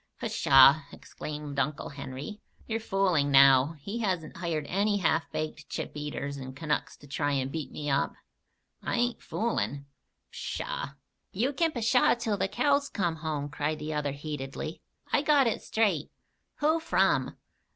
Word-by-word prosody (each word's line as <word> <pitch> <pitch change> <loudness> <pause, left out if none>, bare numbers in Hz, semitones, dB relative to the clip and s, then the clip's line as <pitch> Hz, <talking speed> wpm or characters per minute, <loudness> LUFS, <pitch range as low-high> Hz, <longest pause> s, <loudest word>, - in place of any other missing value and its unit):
"Pshaw!" 135 +3 +6
exclaimed 150 -2 -6
Uncle 140 +2 -1
Henry. 140 +7 -7 0.3
"You're 225 0 -2
fooling 190 -9 +1
now. 135 +2 +6
He 205 +10 -4
hasn't 180 -9 -2
hired 165 -4 -2
any 205 +6 +1
half 165 -5 +1
baked 155 0 -4
chip - - -4
eaters 145 -1 -4
and 130 -1 -7
Canucks 150 0 -2
to 145 - -15
try 145 +1 -1
and 135 -1 -1
beat 160 -1 -4
me 150 - -5
up?" 140 -1 +1 0.7
"I - - -2
ain't 245 0 0
foolin'." 145 -11 -2 0.5
"Pshaw!" 140 - -4 0.4
"You 245 +9 0
kin 325 +3 +2
'pshaw' 240 -1 +3
till 220 -3 -1
the - - +1
cows 280 +6 +1
come 175 -5 -1
home," 155 -2 -3
cried 150 +2 -2
the 155 +1 -4
other 145 -2 -1
heatedly. 145 +1 -5 0.3
"I - - +4
got 290 -2 +4
it 230 - 0
straight." 200 -10 +1 0.5
"Who 315 +2 +3
from?" 325 - +1
155 Hz, 150 wpm, -29 LUFS, 145-215 Hz, 0.7 s, Pshaw